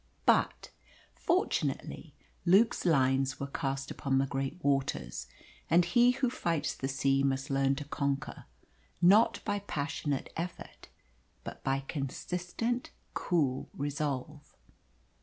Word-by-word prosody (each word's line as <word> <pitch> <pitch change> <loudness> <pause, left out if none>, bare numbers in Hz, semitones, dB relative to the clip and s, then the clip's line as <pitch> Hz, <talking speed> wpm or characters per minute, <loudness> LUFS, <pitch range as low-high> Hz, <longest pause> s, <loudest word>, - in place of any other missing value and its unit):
But, - - +2 0.4
fortunately, 370 +5 -1 0.3
Luke's 195 +6 +4
lines 135 -3 +2
were 140 - -2
cast 135 -1 -3
upon 135 -2 0
the 135 - +3
great 135 +2 -3
waters, 135 - -1 0.4
and 170 +1 +5
he 240 +7 +5
who 255 +1 +1
fights 170 - -1
the 135 - -4
sea 135 0 +2
must 135 0 0
learn 135 0 +2
to 145 +1 -5
conquer, 140 -1 -2 0.5
not 200 +6 +5
by 205 -1 0
passionate 145 -6 -3
effort, 170 +2 -6 0.6
but - - -8
by 135 0 +1
consistent, 180 - -3 0.2
cool 140 -8 0
resolve. 145 0 -3
140 Hz, 115 wpm, -31 LUFS, 135-175 Hz, 0.6 s, and